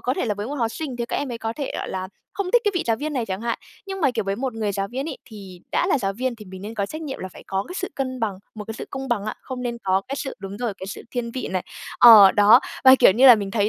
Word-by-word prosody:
có 255 +2 -1
thể - - -1
là 210 - -1
với 205 +2 -5
một 285 - -4
học 235 -5 -1
sinh 275 -4 -5
thì 235 - -2
các - - -3
em 275 -4 -3
ấy 230 - -5
có 225 0 -3
thể, 275 +2 -5
gọi - - -4
là, 185 0 -4 0.2
không 395 -3 -3
thích 480 +2 +4
cái 415 - +2
vị 350 - 0
giáo 225 -1 +2
viên 300 +4 -4
này 250 -5 -2
chẳng 190 -1 -4
hạn, 235 0 -2 0.3
nhưng 385 -1 -5
mà, 275 -6 +3
kiểu, 225 -4 -2
với 195 0 -2
một 255 0 -3
người 215 -2 -2
giáo 195 0 -2
viên 265 +5 -4
ấy, 290 - -6
thì 195 -5 -12
đã - - +2
là 360 - +2
giáo 195 -5 -1
viên 250 +4 -2
thì 215 - -11
mình 190 -1 -10
nên 215 +3 -7
có 200 -2 -1
trách 310 +8 -7
nhiệm 285 -4 -5
là 185 - -6
phải - - -14
có 195 +1 -2
cái 360 - -7
sự 370 - -3
cân 260 -2 -3
bằng, 205 -4 -2 0.2
một 210 -1 -7
cái 220 +1 -6
sự - - -6
công 270 -1 -5
bằng 215 -4 -1
á, 215 - -3
không 255 -2 -7
nên 240 -1 -3
có 190 0 +2
cái 275 - -3
sự 270 -1 -4
đúng 195 +1 -7
rồi, 230 -3 -3
cái 190 - -7
sự 195 - -7
thiên 240 -2 -3
vị 255 +2 -5
này. 185 -1 -1 0.4
Ờ, 215 -5 +10
đó. 210 +5 +7 0.2
Và, 260 0 +10
kiểu - - +7
như 250 +7 +5
là, 250 - +11
mình 200 -3 -3
thấy 210 -1 +1
230 Hz, 340 wpm, -23 LUFS, 200-265 Hz, 0.4 s, là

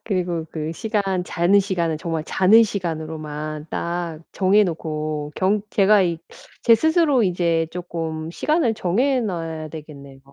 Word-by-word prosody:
그리고 180 -5 -1
그 155 -1 -4
시간 195 -2 -1
자는 180 +4 +3
시간은 175 -5 -1
정말 165 -1 -3
자는 205 +7 +5
시간으로만 155 -5 -4
딱 170 -2 -3
정해 200 +2 +4
놓고 155 -3 -3
경 200 +2 +1
제가 200 0 +4
이 170 -3 -1 0.4
제 230 - +7
스스로 315 -1 +3
이제 170 -3 +1
쪼끔 165 -2 -5
시간을 300 - +1
정해 250 +9 +1
놔야 165 -7 -4
되겠네요. 145 -3 -11
175 Hz, 280 characters per minute, -22 LUFS, 160-200 Hz, 0.4 s, 제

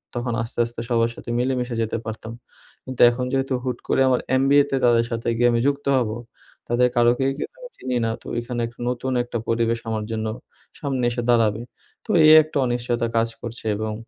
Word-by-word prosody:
তখন 120 0 -2
আস্তে, 115 - -7
আস্তে 115 0 -7
সবার 115 -1 +2
সাথে - - -10
মিলেমিশে 125 -1 -1
যেতে 110 0 -1
পারতাম। 110 +1 -6 0.5
কিন্তু 130 -1 -4
এখন 125 +1 -2
যেহেতু 135 0 0
হুট 125 -2 -2
করে - - +2
আমার 125 - +2
এমবিএতে 140 +1 +3
তাদের 115 -1 +4
সাথে 115 0 -3
গিয়ে 120 +1 +4
আমি 115 0 +1
যুক্ত 140 0 -1
হব, 120 -4 0 0.6
তাদের 120 +1 +3
কারকেই 120 +3 +3
কিন্তু - - -6
আমি - - -9
চিনি 125 -1 -2
না 115 - 0
তো - - -13
এখানে 120 0 -5
একটা 115 - -16
নতুন 125 +1 -3
একটা 120 -1 -5
পরিবেশ 115 0 +1
আমার 110 -1 -2
জন্য 110 0 -2 0.5
সামনে 135 -5 -2
এসে 120 0 -3
দাঁড়াবে 115 -2 +3 0.4
তো - - -20 0.2
এই 155 - +8
একটা 155 -1 -5
অনিশ্চয়তা 120 -1 -1
কাজ 115 0 +3
করছে 115 -1 -8
এবং 110 0 -3
120 Hz, 190 wpm, -23 LUFS, 115-130 Hz, 0.6 s, এই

